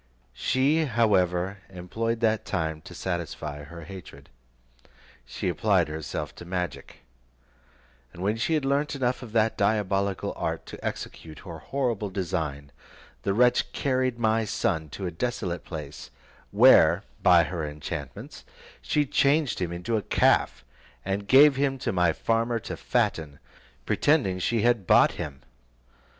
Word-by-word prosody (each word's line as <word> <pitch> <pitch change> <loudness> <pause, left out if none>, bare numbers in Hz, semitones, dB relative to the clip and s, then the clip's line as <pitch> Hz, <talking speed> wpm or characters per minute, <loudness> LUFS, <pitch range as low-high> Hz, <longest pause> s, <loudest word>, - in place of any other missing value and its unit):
She 140 - +1
however 100 - +1
employed 110 +6 -3
that 110 -1 +2
time 80 -4 -3
to - - -10
satisfy 80 -4 -4
her 85 +3 -10
hatred. 95 +2 -11 1.0
She - - -4
applied - - +2
herself 80 -1 -5
to - - -9
magic, 90 -3 -5 1.1
and 90 - -8
when 105 +2 +1
she 160 +8 0
had 150 -3 -1
learnt 140 +2 0
enough 125 -2 -1
of 120 -4 -9
that 110 -1 +1
diabolical 100 -2 0
art - - -3
to - - -10
execute 80 -2 -6
her 85 -4 -9
horrible 115 - -2
design, 80 -7 -3 0.5
the 100 0 -1
wretch 125 +2 +3
carried 130 -3 0
my 110 -1 +2
son 80 -6 -1
to 95 - -6
a 90 - -2
desolate 90 -3 -3
place, 75 -6 -8 0.4
where, - - +6 0.2
by 90 -2 +6
her 85 -2 -4
enchantments, 75 -2 -7 0.4
she 150 -1 +1
changed 140 +1 +2
him 85 -2 -1
into 90 +7 -2
a - - -1
calf, 90 - +2 0.4
and 100 +1 -2
gave 135 +2 +7
him 135 -1 +1
to 125 -2 -2
my 90 -3 +3
farmer 115 +6 0
to - - -6
fatten, 75 -3 -1 0.5
pretending 130 -12 +2
she 115 +4 0
had 120 -6 +2
bought - - +6
him. 70 -2 -7
100 Hz, 140 wpm, -26 LUFS, 85-120 Hz, 1.1 s, gave